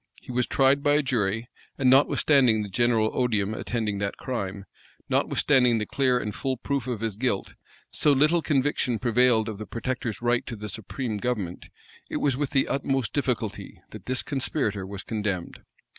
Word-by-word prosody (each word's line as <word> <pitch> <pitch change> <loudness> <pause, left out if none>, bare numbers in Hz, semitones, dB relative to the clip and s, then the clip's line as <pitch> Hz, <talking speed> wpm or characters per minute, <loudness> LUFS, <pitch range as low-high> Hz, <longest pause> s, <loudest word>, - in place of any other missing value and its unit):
He - - -10
was 125 0 0
tried 135 +1 +3
by 145 0 +3
a 150 - +3
jury; 115 -3 0 0.3
and, 135 - +1
notwithstanding 130 -3 +4
the 100 - -6
general 115 +1 +2
odium 110 -5 0
attending 110 -3 -2
that 100 0 -3
crime, 100 -6 -4 0.4
notwithstanding 125 -5 +3
the 105 - -1
clear 130 -1 +1
and 105 -4 -3
full 130 +3 -2
proof 135 0 -2
of 120 -4 -3
his 110 -3 -2
guilt, 115 -3 -1 0.4
so 150 - +2
little 150 +5 +4
conviction 135 -5 +1
prevailed 120 -1 +3
of 105 -2 -5
the 110 - -6
protector's 120 -1 -3
right 120 0 +1
to 120 - -5
the 105 0 -7
supreme 110 +3 -4
government, 100 -6 -3 0.4
it - - -2
was 140 -3 +1
with 140 +1 -1
the 135 - +2
utmost 135 -4 -1
difficulty[*] 125 -7 -2
that - - -11
this 130 -1 0
conspirator 120 -8 -2
was 100 0 -6
condemned. 105 -5 -3
120 Hz, 175 wpm, -26 LUFS, 105-135 Hz, 0.4 s, notwithstanding